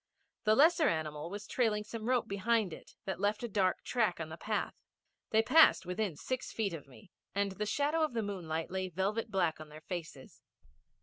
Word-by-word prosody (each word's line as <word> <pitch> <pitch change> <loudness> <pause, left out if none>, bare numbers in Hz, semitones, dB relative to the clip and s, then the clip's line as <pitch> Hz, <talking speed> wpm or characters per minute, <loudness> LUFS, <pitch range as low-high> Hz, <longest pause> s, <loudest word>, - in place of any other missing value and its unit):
The 215 0 +5
lesser 320 +3 +5
animal 155 0 -3
was 205 +2 -6
trailing 215 -3 +1
some 225 +2 -5
rope 250 -2 +2
behind 200 -1 +1
it - - -12
that 190 -2 -3
left 205 +3 0
a - - -1
dark 195 -4 +1
track 215 -8 +1
on 160 -1 -4
the 160 - -6
path. 210 +5 -2 0.6
They 220 0 +4
passed 310 -6 +6
within 180 -1 -2
six 255 - -4
feet 205 -5 -1
of 150 -4 -7
me, 125 -5 -17 0.2
and 200 0 +1
the 210 +2 -3
shadow 290 +7 +1
of 310 -4 +1
the 225 -1 -1
moonlight 165 -6 -3
lay 185 0 -2
velvet 195 +6 -1
black 175 -5 +1
on 155 - -10
their 155 +1 -11
faces. 155 -5 -7
200 Hz, 195 wpm, -33 LUFS, 170-225 Hz, 0.6 s, passed